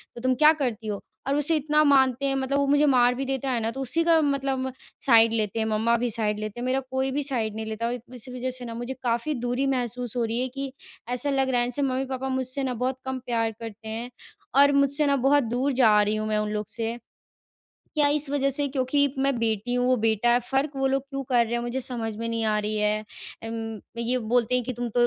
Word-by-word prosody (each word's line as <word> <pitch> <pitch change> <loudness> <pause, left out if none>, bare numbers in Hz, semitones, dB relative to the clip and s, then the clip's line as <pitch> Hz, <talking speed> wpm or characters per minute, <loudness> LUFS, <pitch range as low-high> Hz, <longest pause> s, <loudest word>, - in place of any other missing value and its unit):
तो 235 - -8
तुम 255 0 +2
क्या 305 +2 +7
करती 245 -7 -3
हो? 205 -2 -3 0.3
और 275 - +1
उसे 295 +3 +1
इतना 300 0 +2
मानते 270 -2 +3
हैं, 270 0 +1
मतलब 270 +1 0
वो 280 - +1
मुझे 290 +1 +4
मार 250 -3 +4
भी 270 +2 -3
देता 270 0 -2
है 245 - 0
ना, 225 +1 -1
तो 270 - -6
उसी 290 +6 0
का 330 -1 +4
मतलब 270 -2 -1 0.3
साइड 230 -3 +6
लेते 220 0 -1
हैं, 220 - 0
मम्मा 220 +2 +2
भी 240 +1 0
साइड 210 -1 -1
लेते 215 +2 -5
हैं, 245 - -3
मेरा 260 +1 +1
कोई 265 0 0
भी 290 +2 -1
साइड 230 -6 -2
नहीं 220 0 -4
लेता। 220 +1 -4
और 240 - -1 0.2
इसी 250 +1 -10
वज़ह 255 +1 -2
से 250 - -8
ना 230 - -6
मुझे 240 +3 -4
काफ़ी 240 +5 0
दूरी 245 +2 0
महसूस 245 -1 -3
हो 240 - +1
रही 225 +1 -2
है, 255 - 0
कि 270 +1 -5 0.4
ऐसा 250 +3 -1
लग 270 -1 +1
रहा 245 -1 +2
है, 240 - 0
जैसे 250 +4 -3
मम्मी-पापा 265 0 -2
मुझसे 260 +1 0
ना 260 -1 -1
बहुत 255 +2 -2
कम 260 0 -3
प्यार 230 -2 0
करते 225 -1 -9
हैं। 225 +3 -5 0.5
और 285 +1 +7
मुझसे 280 +1 +3
ना 280 -1 +3
बहुत 285 0 +4
दूर 250 +4 -1
जा 220 -5 +5
रही 210 +1 +1
हूँ 215 0 -2
मैं 215 0 0
उन 210 0 -1
लोग 210 0 -2
से, 230 0 -3 1.0
क्या 295 -1 +4
इस 300 -1 +2
वज़ह 275 -1 +1
से 285 +1 +4
क्योंकि 275 +1 +1
मैं 270 -2 +1
बेटी 225 +1 -1
हूँ, 245 0 +1
वो 255 - +4
बेटा 225 0 +1
है, 240 - +5
फ़र्क 270 +2 +1
वो 270 0 +1
लोग 270 0 +1
क्यों 275 0 -5
कर 240 -2 +4
रहे 230 - -6
हैं? 240 - +1
मुझे 240 +2 -3
समझ 240 -3 -4
में 230 +1 -4
नहीं 230 -1 -1
आ 215 -1 +2
रही 210 +1 -2
है। 210 0 +2 0.5
उम, 225 -2 -5 0.2
ये 240 +2 +1
बोलते 245 0 +2
हैं 250 -1 +1
कि 255 - -3
तुम 240 0 -4
तो 240 +2 +3
250 Hz, 255 wpm, -25 LUFS, 230-270 Hz, 1.0 s, क्या